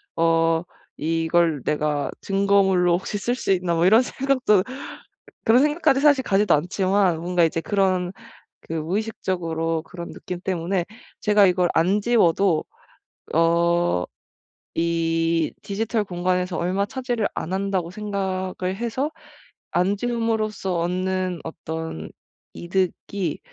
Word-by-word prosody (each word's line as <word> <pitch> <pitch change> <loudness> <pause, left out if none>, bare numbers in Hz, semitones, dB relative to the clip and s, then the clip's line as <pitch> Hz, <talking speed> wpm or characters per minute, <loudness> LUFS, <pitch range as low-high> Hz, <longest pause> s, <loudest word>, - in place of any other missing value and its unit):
어 165 0 +2 0.4
'이걸 165 -1 +1
내가 150 -1 0
증거물로 195 -3 +3
혹시 200 +2 -4
쓸 240 +4 -1
수 220 - -2
있나?' 180 -2 +1
뭐 165 +1 +2
이런 220 +5 +7
생각도 255 -7 +2 0.8
그런 235 +4 +6
생각까지 295 -2 +2
사실 285 -3 +5
가지도 200 -2 +3
않지만 185 +2 +1
뭔가 175 +1 +1
이제 165 0 -1
그런 185 0 +1 0.5
그 165 - -8
무의식적으로 165 -3 -2
그런 170 0 -8
느낌 180 -1 -6
때문에 180 -1 -1 0.4
제가 210 -1 +5
이걸 180 -1 +2
안 185 +6 +2
지워도 195 -6 +3 0.7
어 170 - +2 0.7
이 165 -1 +1
'디지털 215 +2 -1
공간에서 180 -1 -1
얼마 190 +4 0
차지를 245 -3 -2
안 170 - -4
한다.'고 190 -3 -1
생각을 190 -2 -3
해서 240 +7 -2 0.6
'안 185 +3 +1
지움으로써 220 -5 -1
얻는 185 +1 -1
어떤 160 - -6 0.4
이득이 185 -1 -2
185 Hz, 255 characters per minute, -23 LUFS, 165-205 Hz, 0.8 s, 이런